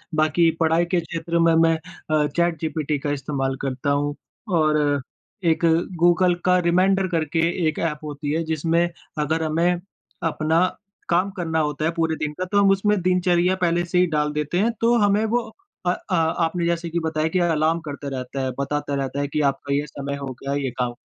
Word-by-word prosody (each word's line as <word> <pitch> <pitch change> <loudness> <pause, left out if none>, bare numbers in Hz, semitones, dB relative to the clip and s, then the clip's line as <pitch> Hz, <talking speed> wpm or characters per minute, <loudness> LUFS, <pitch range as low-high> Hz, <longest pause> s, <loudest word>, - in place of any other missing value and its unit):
बाकी 155 +2 +3
पढ़ाई 165 +1 +3
के 180 - +4
क्षेत्र 170 +1 -2
में 165 0 +4
मैं 165 0 +4
अ, 155 -3 -2
चैट 170 +1 0
जीपीटी 155 -2 -1
का 145 +1 -2
इस्तेमाल 135 -1 -2
करता 135 +1 -2
हूँ। 145 +1 0 0.4
और 150 -2 +2 0.5
एक 170 - -2 0.3
गूगल 175 +1 +4
का 180 0 +5
रिमाइंडर 185 +2 +2
करके 165 -2 -1 0.3
1 155 - -1
एप 150 -3 -1
होती 145 -1 -4
है, 165 +2 0
जिसमें 165 +2 +1 0.3
अगर 160 +2 0
हमें 170 +3 +1 0.5
अपना 160 +4 +2 0.4
काम 180 +3 +2
करना 160 -2 -1
होता 150 0 -1
है 165 - +2
पूरे 165 -1 0
दिन 150 -1 -3
का, 185 - -1
तो 205 +3 -1
हम 200 - +5
उसमें 200 0 +2
दिनचर्या 180 0 +2
पहले 175 0 +2
से 180 +1 -1
ही 180 - +5
डाल 150 -2 0
देते 150 +3 -2
हैं, 225 +4 +2
तो 235 +1 +4
हमें 205 -1 +3
वो 230 0 -1 0.4
अ - - +4
अ, 185 - -5
आपने 165 +1 +1
जैसे 170 0 -1
कि 170 +1 -1
बताया 160 -1 -1
कि 185 - +2
अलार्म 165 -1 +2
करता 145 -2 -7
रहता 130 0 -4
है, 130 0 -1
बताता 145 +1 -2
रहता 135 0 -2
है 145 - 0
कि 150 +2 -1
आपका 140 +1 -4
ये 145 +1 0
समय 140 0 -5
हो 140 -1 -6
गया 140 0 -2
ये 140 -2 -1
काम। 125 -1 0
160 Hz, 195 wpm, -23 LUFS, 150-175 Hz, 0.5 s, का